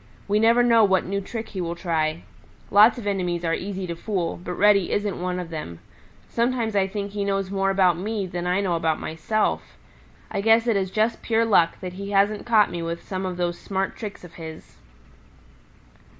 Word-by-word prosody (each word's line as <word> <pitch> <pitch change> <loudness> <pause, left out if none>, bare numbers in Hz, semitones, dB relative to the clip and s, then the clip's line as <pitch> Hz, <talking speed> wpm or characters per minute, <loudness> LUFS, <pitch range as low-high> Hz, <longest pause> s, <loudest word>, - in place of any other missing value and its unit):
We 205 +1 +2
never 230 +2 +5
know 230 -2 +5
what 190 -2 +3
new 200 +2 -2
trick 220 +2 -6
he 190 - -5
will 170 0 -3
try. 160 - -1 0.5
Lots 210 +5 +7
of 235 - -7
enemies 180 -4 -1
are 165 - +1
easy 190 +1 -3
to 170 -1 -4
fool, 175 -2 -3
but 180 - -4
Reddy 200 -2 +4
isn't 205 -3 -1
one 180 0 -2
of 175 -2 -6
them. 150 - -6 0.5
Sometimes 235 -2 0
I 195 -1 +3
think 200 0 -4
he 205 0 -2
knows 195 -1 -1
more 195 -1 +1
about 185 -3 +3
me 210 +1 -2
than 175 -1 -4
I 180 +2 +1
know 185 -4 0
about 160 -1 0
myself. 160 - -2 0.5
I 200 - -1
guess 225 +2 +4
it 230 -3 +2
is 190 -1 0
just 220 +4 0
pure 230 0 +1
luck 175 -7 +3
that 180 -1 -5
he 200 +2 -6
hasn't 205 +2 +1
caught 220 -3 +4
me 175 - -4
with 170 0 -4
some 190 -1 -3
of 180 -1 -5
those 175 -1 -2
smart 195 -1 -2
tricks 210 -5 -7
of 175 -2 -12
his. 160 -1 -10
195 Hz, 205 wpm, -24 LUFS, 175-210 Hz, 0.5 s, Lots